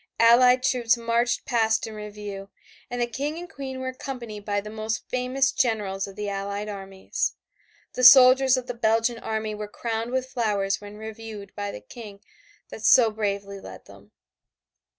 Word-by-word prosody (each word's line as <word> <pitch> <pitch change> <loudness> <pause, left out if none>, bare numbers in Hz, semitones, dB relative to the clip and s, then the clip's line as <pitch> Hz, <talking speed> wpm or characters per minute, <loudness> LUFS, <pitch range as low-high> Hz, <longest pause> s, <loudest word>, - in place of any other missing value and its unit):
Allied 250 +2 +6
troops 240 -3 +2
marched 235 +1 0
past 225 -2 +1
in 220 - -8
review, 210 -2 -8 0.4
and 245 0 -4
the 240 - +2
King 280 +6 -4
and 350 +1 -7
Queen 265 -4 -7
were 260 0 -3
accompanied 245 -5 -7
by 205 0 -1
the 210 +1 -8
most 220 +1 -4
famous 255 +1 +1
generals 200 -5 -1
of 195 - -11
the 210 0 -4
Allied 200 +1 -4
armies. 195 -2 -4 0.6
The 250 - -3
soldiers 255 +1 +8
of 255 - -4
the 245 - -4
Belgian 230 0 +1
army 220 -1 -3
were 210 0 -6
crowned 225 +2 -4
with 260 0 0
flowers 210 -6 -1
when 205 0 -10
reviewed 220 -2 -9
by 205 0 -4
the 105 - -9
King 205 - -11 0.5
that 220 - -9
so 230 -1 +6
bravely 200 -2 -3
led - - -11
them. - - -16
225 Hz, 170 wpm, -25 LUFS, 205-250 Hz, 0.6 s, soldiers